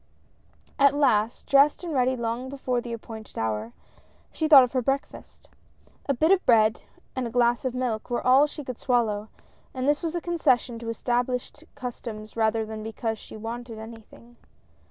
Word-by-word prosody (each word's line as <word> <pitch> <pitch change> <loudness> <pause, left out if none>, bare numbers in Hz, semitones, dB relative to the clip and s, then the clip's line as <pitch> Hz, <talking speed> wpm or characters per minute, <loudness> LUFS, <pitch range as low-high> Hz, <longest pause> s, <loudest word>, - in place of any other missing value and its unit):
At 280 0 +5
last, 230 -6 +2
dressed 280 +4 +4
and 335 -3 -4
ready 260 -1 +2
long 235 +2 -3
before 255 -3 -2
the 240 - -7
appointed 220 -2 -9
hour, 110 0 -2 0.6
she 315 - -1
thought 285 -4 +9
of 250 - -1
her 255 - +1
breakfast. 270 +3 -4 0.6
A - - +4
bit 315 +8 +3
of 390 -1 +4
bread, 220 -3 +4 0.3
and 255 -2 -2
a - - -5
glass 240 +1 +2
of 255 -1 -2
milk 245 -4 -2
were 240 - -2
all 265 +4 +6
she 295 0 -8
could 255 -3 -7
swallow, 220 -4 0 0.5
and 260 +1 -2
this 290 0 +2
was 335 -1 -3
a - - 0
concession 255 -9 +1
to 230 -1 -6
established 245 +5 -2
customs 230 -5 -7
rather 220 0 +1
than 215 0 -7
because 225 0 -4
she - - -11
wanted 230 +1 -6
anything. 225 +1 -12
240 Hz, 175 wpm, -26 LUFS, 225-270 Hz, 0.6 s, thought